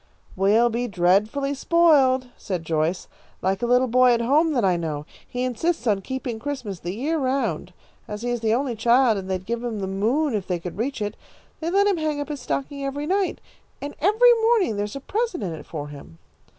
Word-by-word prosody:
"We'll 215 +5 +3
be 240 +2 -1
dreadfully 210 +9 +1
spoiled," 275 -5 +3
said 180 -4 -5
Joyce, 160 +3 -1 0.4
"like 190 +1 0
a 240 - 0
little 250 +1 +4
boy 250 +1 +5
at 235 - +1
home 300 +7 +3
that 240 -7 +1
I 185 -2 +3
know. 155 -3 -3 0.2
He 250 0 -3
insists 255 +4 -1
on 205 -4 +2
keeping 260 0 -4
Christmas 245 -9 -5
the 175 +4 -5
year 305 +8 -1
around. 265 0 -1 0.4
As 210 +1 -6
he 245 - -1
is 240 - -1
the 220 -1 0
only 245 +1 0
child, 235 0 +3
and 190 0 -8
they'd 185 -1 -2
give 235 +2 -3
him 235 -3 -3
the 195 - -3
moon 230 +10 0
if 205 -4 -2
they 180 - 0
could 175 +3 -8
reach 240 -2 -2
it, 205 0 -4 0.4
they 325 - -2
let 395 +3 +3
him 400 -3 +2
hang 310 -2 -1
up 290 - -4
his 290 -3 -5
stocking 280 +2 -3
every 280 +2 -3
night, 385 +3 0 0.4
and 285 +1 -6
every 440 +7 +6
morning 445 - +3
there 205 0 -1
is 210 - -8
a - - -4
present 415 - -2
in 175 -4 -3
it 150 -2 -10
for 150 -3 -6
him." 140 - -12
245 Hz, 215 wpm, -24 LUFS, 195-285 Hz, 0.4 s, every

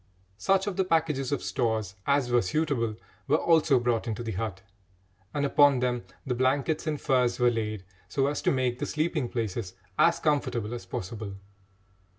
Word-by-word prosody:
Such 195 0 +2
of 205 -3 -3
the 190 - +3
packages 155 -6 0
of 145 - -1
stores 110 -6 -1
as 140 -3 +2
were 120 0 +4
suitable 115 - 0 0.3
were 145 +2 +4
also 160 -6 +4
brought 120 -1 0
into 115 +1 -3
the 115 - -3
hut, 100 -1 -4 0.7
and 145 +3 0
upon 145 -1 +5
them 125 -3 -1 0.2
the 125 - -1
blankets 135 +5 +1
and 150 -2 -1
furs 125 -3 +2
were 125 -1 +4
laid 110 -4 -3 0.3
so 135 +6 +1
as 145 +1 -1
to - - +2
make 130 -2 0
the - - -2
sleeping 155 -4 -1
places 110 -5 -3 0.2
as 170 0 +5
comfortable 120 -7 0
as 115 -6 -7
possible. 100 +2 -5
125 Hz, 170 wpm, -28 LUFS, 115-145 Hz, 0.7 s, upon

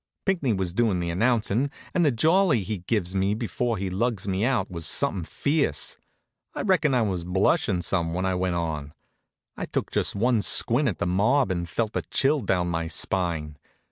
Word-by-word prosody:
Pinckney 175 - +1
was 95 -3 -2
doin' 105 -4 +1
the 85 -1 -2
announcin' 115 +5 +1 0.2
and 175 - +2
the 150 - +4
jolly 160 - +3
he 105 +1 -4
gives 90 -1 -1
me 100 +2 +1
before 115 +1 -2
he 95 0 -3
lugs 105 0 -1
me 95 +1 -1
out 125 -5 0
was 85 -2 -3
somethin' 90 -4 0
fierce. 140 - 0 0.6
I - - -3
reckon 170 -8 +2
I 120 - +3
was 95 -5 -2
blushin' 90 0 +1
some 85 -3 0
when 90 +1 -1
I 95 - +1
went 90 -1 -1
on. 80 -3 -4 0.6
I - - -4
took - - -3
just - - 0
one 115 +2 +2
squint 125 +7 +3
at 95 - -4
the - - -2
mob 105 +7 +2
and 85 -2 -3
felt 110 +3 -2
a - - 0
chill 145 +2 +1
down 90 -4 0
my 85 0 -2
spine. 80 -3 -1
100 Hz, 190 wpm, -25 LUFS, 90-120 Hz, 0.6 s, the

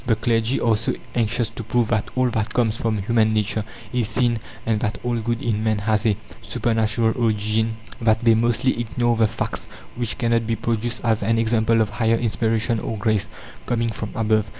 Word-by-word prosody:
The 115 - +4
clergy 115 +2 +1
are 115 -2 +3
so 110 +2 -1 0.2
anxious 115 -1 0
to 115 - -7
prove 115 +1 +1
that 105 -2 0
all 130 -1 +2
that 110 -1 -2
comes 115 -3 +2
from 115 -2 -1
human 110 0 +2
nature 110 0 0 0.3
is 120 -3 0
sin, 120 0 +1 0.3
and 110 -2 +1
that 105 0 -2
all 120 -1 0
good 115 +1 -2
in 110 -2 0
man 110 -1 +1
has 105 +1 +1
a 105 -3 +2 0.2
supernatural 110 -1 +1
origin, 110 -1 0 0.2
that 110 -1 +3
they 115 -1 +5
mostly 120 +3 +1
ignore 120 0 0
the 110 -1 +3
facts - - -4 0.3
which 120 -2 -2
cannot 115 -2 +1
be 115 - +1
produced 115 +1 -2
as 110 -2 +2
an 115 +3 +1
example 115 0 +2
of 105 -2 0
higher 115 +1 +2
inspiration 115 0 0
or 110 - -4
grace, 110 -1 0 0.4
coming 115 -1 0
from 110 0 -5
above. 110 -1 +1
115 Hz, 195 wpm, -22 LUFS, 110-120 Hz, 0.4 s, they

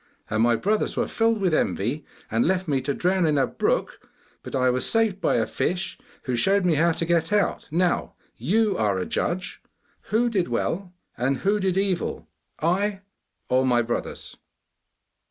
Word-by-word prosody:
And 110 +1 +1
my 120 0 +4
brothers 210 - 0
were - - +1
filled 225 -1 +1
with 185 -4 +1
envy, 135 +1 -1 0.2
and 115 +2 +2
left 185 +1 0
me 140 -3 +1
to 140 +2 -1
drown 180 -1 +2
in 150 -2 +2
a 135 - +4
brook, - - -1 0.4
but - - -7
I 130 -1 +3
was 125 0 0
saved 220 -4 +1
by - - +2
a - - +2
fish 180 +1 -2 0.2
who 125 - -1
showed 195 +10 +3
me 175 - +3
how 165 +3 +3
to 165 - -2
get 170 +2 +1
out. 210 -1 +1
Now, 175 +3 0 0.2
you 205 - +1
are 105 -3 +1
a 95 - -2
judge! 180 +1 -3 0.5
Who 230 +3 +2
did 195 -7 0
well, 180 +2 -2 0.3
and 130 +2 +1
who 205 +1 +3
did 190 -1 0
evil 195 -3 -1 0.3
I 195 +5 0 0.5
or 130 +1 +2
my 120 -2 +3
brothers? 120 +1 -4
175 Hz, 175 wpm, -24 LUFS, 130-195 Hz, 0.5 s, my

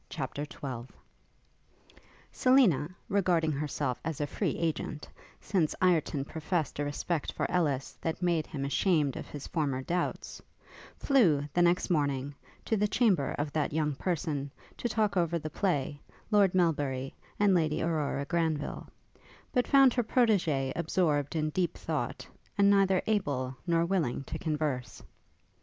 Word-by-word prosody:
CHAPTER 145 -1 -4
XII 125 -3 -6 1.4
Selina, 245 - +4 0.2
regarding 175 -5 +2
herself 145 -3 -2
as 160 -3 -3
a 145 - 0
free - - -2
agent, 160 -2 -3 0.3
since 175 -7 0
Ireton 160 -6 +2
professed 160 -1 -2
a - - +1
respect 145 +2 -2
for - - -1
Ellis 145 -7 0
that 160 - -2
made 170 -3 +1
him 140 -4 -4
ashamed 150 -2 +1
of - - -6
his 145 -2 -8
former 140 -5 -1
doubts, 175 +4 -3 0.6
flew, 170 - +3
the 175 - +3
next 175 +1 +2
morning, 140 -3 0 0.3
to 225 - +1
the 210 0 +2
chamber 205 - +2
of 145 0 -2
that 150 -1 0
young 150 -1 +1
person, 150 -3 -2 0.3
to 240 - -2
talk 215 -3 +1
over 170 -1 +1
the 155 -1 -6
play, 145 -7 -1 0.3
Lord 200 -3 +4
Melbury, 145 -7 0 0.3
and 205 -2 +4
Lady 155 -3 +1
Aurora 150 -4 -1
Granville: 160 -3 -1 0.7
but 250 -2 +2
found 270 -3 +6
her 245 - +1
protégée 180 - +2
absorbed 155 -4 0
in 155 -1 0
deep 180 +1 -1
thought, - - -3 0.3
and 200 0 +5
neither 195 -2 +3
able 140 -12 -1
nor 170 -1 +3
willing 170 -8 0
to - - -6
converse. 150 -6 -2
160 Hz, 145 wpm, -30 LUFS, 145-185 Hz, 1.4 s, found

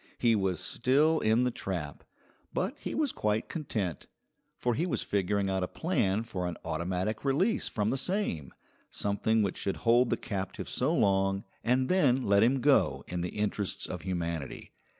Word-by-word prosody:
He 115 -2 +3
was 95 -5 0
still 145 +6 +2
in 110 +3 +3
the 125 - +1
trap, 85 -10 -5 0.5
but 195 +10 -1
he - - -4
was 300 -4 +1
quite 105 +1 -1
content, 105 - -3 0.5
for 120 - 0
he 165 +9 0
was - - -1
figuring 100 0 0
out 95 -1 0
a 90 - 0
plan 110 - 0
for 90 -6 -3
an 90 - -4
automatic 90 +6 -2
release 165 +12 +1
from 105 -1 0
the 135 - 0
same, 140 - -1 0.4
something 105 +2 +1
which 100 - -2
should 100 - -2
hold 120 +1 +5
the - - +1
captive 95 -5 -4
so 130 +5 0
long 95 -4 +2 0.2
and 130 +2 +2
then 135 -9 +3
let 100 -2 +4
him 125 +4 +3
go 145 +1 +3
in 90 -1 -3
the 90 - -2
interests 105 -1 -1
of 90 - -5
humanity. 85 -5 -4
105 Hz, 170 wpm, -30 LUFS, 95-130 Hz, 0.5 s, hold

